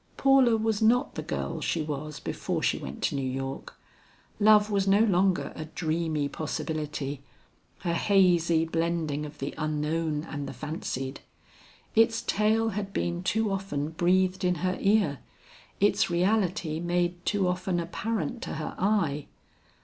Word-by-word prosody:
Paula 270 -4 +5
was 220 -1 0
not 245 +5 +3
the - - -4
girl - - -4
she 165 - 0
was 150 0 -5
before - - -3
she - - +1
went 65 +2 -7
to - - +1
New 140 - -1
York. 135 +1 -5 0.6
Love 210 0 +5
was 200 -1 +1
no 200 +2 +5
longer 190 -3 +2
a 155 - -5
dreamy 160 -2 -1
possibility, 150 -2 -4 0.6
a 170 - +1
hazy 170 -3 +3
blending 165 -3 -1
of 150 - -13
the 135 - -4
unknown 155 0 -1
and 145 -3 -5
the - - -7
fancied; 135 -4 -4 0.7
its 225 0 +3
tale 220 +2 +2
had 200 -1 -4
been 175 -1 -1
too 215 +3 0
often 190 -7 -2
breathed 185 +3 +1
in 180 0 +2
her 185 0 +1
ear, 195 -9 +2 0.6
its 205 0 +3
reality 175 -3 +1
made 175 0 -1
too 195 -2 +1
often 180 0 -1
apparent 225 +8 -3
to - - -5
her 155 - -4
eye. 180 -8 +1
175 Hz, 145 wpm, -28 LUFS, 155-205 Hz, 0.7 s, Paula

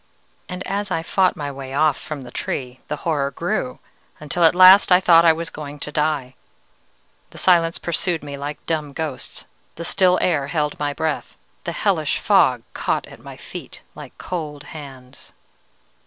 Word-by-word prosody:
"And 180 0 -5
as 200 +1 -2
I 165 -3 -1
fought 185 +1 +2
my 145 -1 -4
way 135 -1 -7
off 155 -1 +3
from 145 0 -7
the 125 - -11
Tree, 125 -1 -4
the - - -2
horror 145 -4 +1
grew, 135 -3 -3 0.4
until 150 +3 -2
at 165 +1 +6
last 185 +2 +8
I 180 - +7
thought 170 -2 +6
I 165 - +8
was 165 +1 -4
going 145 -1 -8
to 150 - -6
die. 150 -4 -1 1.0
The - - -14
silence 170 -2 +3
pursued 170 -1 -1
me 145 -1 -6
like 145 +1 -6
dumb 155 -3 -2
ghosts, 155 -3 -5 0.3
the 170 - -6
still 180 +1 +4
air 145 -6 +1
held 150 -1 -2
my 145 -1 -1
breath, 155 +1 -3 0.3
the - - -2
hellish - - 0
fog - - +3
caught - - -1
at - - -14
my - - -11
feet - - -10
like - - -11
cold 150 -5 -5
hands. 135 -4 -11
155 Hz, 170 wpm, -21 LUFS, 140-170 Hz, 1.0 s, last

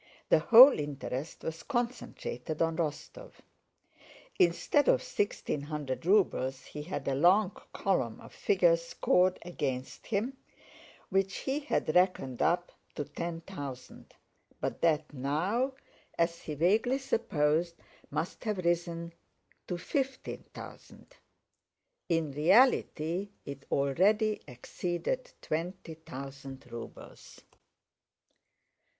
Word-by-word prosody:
The - - +6
whole 240 - +9
interest 145 0 -5
was 160 0 -4
concentrated 240 - -3
on 165 -1 +1
Rostóv. 170 - -4 1.1
Instead 180 - +3
of - - +4
sixteen 200 -7 -2
hundred 150 0 -4
rubles 135 -10 +2
he 150 - -7
had 170 +5 -5
a 135 - +1
long 180 +8 +4 0.2
column 125 - 0
of - - -13
figures 170 -4 +3
scored 180 +2 +2
against 135 -7 -4
him, 235 +5 -1 0.7
which 195 0 +1
he 275 +2 0
had 280 - -1
reckoned 180 -9 +2
up 175 +1 +2 0.2
to 150 - -2
ten 165 +3 -5
thousand, 140 -8 -9 0.4
but - - -3
that 155 -2 +2
now, 175 - 0 0.4
as 170 0 +1
he 155 - -5
vaguely 215 - +3
supposed, 170 - 0 0.3
must 155 +5 -3
have 210 -2 0
risen 170 -1 -1 0.5
to 180 - -2
fifteen 265 +7 -3
thousand. - - -12 0.9
In 165 -3 +1
reality 180 - +3 0.2
it 140 -1 -8
already 205 +10 +2
exceeded 180 - -3
twenty 165 +1 -3
thousand 135 -3 -9
rubles. 115 0 -10
170 Hz, 105 wpm, -31 LUFS, 150-200 Hz, 1.1 s, whole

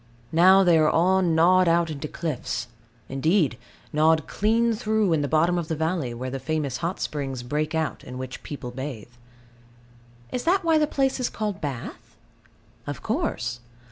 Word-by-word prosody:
Now 185 +4 +6
they 170 -3 +5
are 155 -1 +4
all 185 +3 +3
gnawed 180 +1 +4
out 170 -1 +2
into 150 0 -5
cliffs, 140 -6 -4 0.4
indeed 155 +1 +1 0.4
gnawed 155 0 +3
clean 230 +2 +2
through 215 -3 +1
in 155 - +1
the 145 - -1
bottom 165 +4 +2
of 165 - -4
the 160 - -2
valley, 160 -4 -1
where 125 +2 -5
the 135 - -4
famous 150 -4 -2
hot 170 +7 -3
springs 135 -4 -3
break 150 +5 -2
out 160 -1 -2
in 125 - -8
which 130 0 -6
people 135 -4 -7
bathe. 125 -3 -7 1.2
Is 250 - -2
that 370 +3 +3
why 325 -2 +3
the 300 - +2
place 270 -2 0
is 250 - 0
called 210 -3 -4
Bath? 140 -6 -6 0.7
Of - - -5
course. 120 +1 -2
160 Hz, 170 wpm, -25 LUFS, 135-185 Hz, 1.2 s, Now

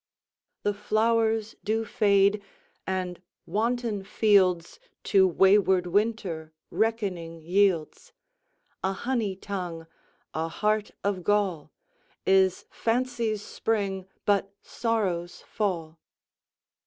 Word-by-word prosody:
The 205 - +1
flowers 220 +1 +1
do 220 +2 0
fade, 200 -1 +3 0.5
and 185 -2 -3 0.2
wanton 225 +1 -1
fieldsTo 190 -1 +2
wayward 190 0 +4
Winter 180 -5 -1 0.2
reckoning 190 -7 -1
yields:A 195 - -2
honey 225 -3 -1
tongue, 180 -4 -5 0.5
a 160 +1 -1
heart 210 +4 0
of 200 -3 -1
gall, 190 -7 0 0.5
Is 190 -1 +3
fancy's 230 -3 -1
spring, 195 -4 -2 0.2
but 200 -1 +2
sorrow's 190 -7 -2
fall. 170 -6 -3
200 Hz, 80 wpm, -27 LUFS, 180-220 Hz, 0.5 s, wayward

